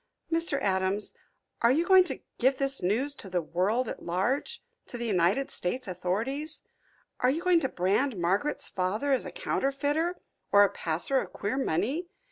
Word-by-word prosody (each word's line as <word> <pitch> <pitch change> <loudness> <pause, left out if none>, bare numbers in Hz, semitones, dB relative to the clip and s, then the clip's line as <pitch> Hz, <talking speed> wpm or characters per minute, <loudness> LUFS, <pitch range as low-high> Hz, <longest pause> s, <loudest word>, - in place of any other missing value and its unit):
"Mr. 330 -4 +2
Adams, 190 +1 0 0.5
are 235 - +5
you 320 +6 +2
going 375 0 +7
to 290 -7 -6 0.2
give 260 +2 +3
this 275 0 0
news 230 +11 +1
to 200 - -9
the 180 -1 0
world 190 +9 0
at - - -6
large 245 - -1 0.2
to 245 - -7
the 235 - -4
United 200 +6 +1
States 250 +7 -3
authorities 225 - -3 0.6
are 250 - +3
you 315 +6 -1
going 360 -2 +5
to 265 -5 -1
brand 205 +7 +1
Margaret's 195 +12 0
father 205 +10 -1
as 265 - +2
a - - -7
counterfeiter, 305 - -1 0.3
or 205 0 +7
a 200 - +3
passer 175 +10 0
of - - -5
queer 205 +4 -3
money? 265 - -1
250 Hz, 170 wpm, -28 LUFS, 190-285 Hz, 0.6 s, going